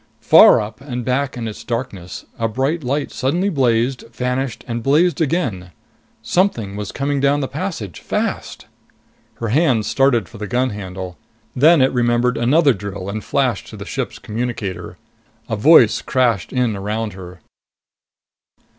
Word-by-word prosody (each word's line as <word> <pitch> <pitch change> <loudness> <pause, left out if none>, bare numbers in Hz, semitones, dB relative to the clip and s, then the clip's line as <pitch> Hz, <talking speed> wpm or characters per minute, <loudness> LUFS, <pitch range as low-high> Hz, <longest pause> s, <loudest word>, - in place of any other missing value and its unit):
Far - - +7
up 110 +3 -6
and 125 -4 -5
back 130 +1 -1
in 115 -2 -4
its 110 - -7
darkness, 115 -8 -5
a 115 - +1
bright 135 +8 -1
light 140 +3 -2
suddenly 170 +9 0
blazed, 125 - +1
vanished, 125 +1 -3
and 120 0 -3
blazed 160 +8 +2
again. 125 - -1 0.5
Something 120 - 0
was 105 -1 -5
coming 140 0 -1
down 140 +1 +2
the 135 - -2
passage, 140 - -5
fast.... - - -3 0.7
Her 115 - -4
hand 125 -4 +2
started 125 -4 +2
for 115 -1 -13
the 105 - -4
gun 125 +3 0
handle. 95 -3 -7 0.4
Then 150 +2 +5
it 130 - +2
remembered 120 0 +2
another 140 +4 +4
drill 100 -2 -6
and 105 +1 -4
flashed - - -1
to - - -10
the - - -8
suit's - - -4
communicator. 110 -4 -5 0.5
A 110 - -2
voice 115 0 +5
crashed 120 -7 0
in 125 -4 0
around 105 +2 -3
her. 90 -1 -11
120 Hz, 150 wpm, -19 LUFS, 105-140 Hz, 0.7 s, Far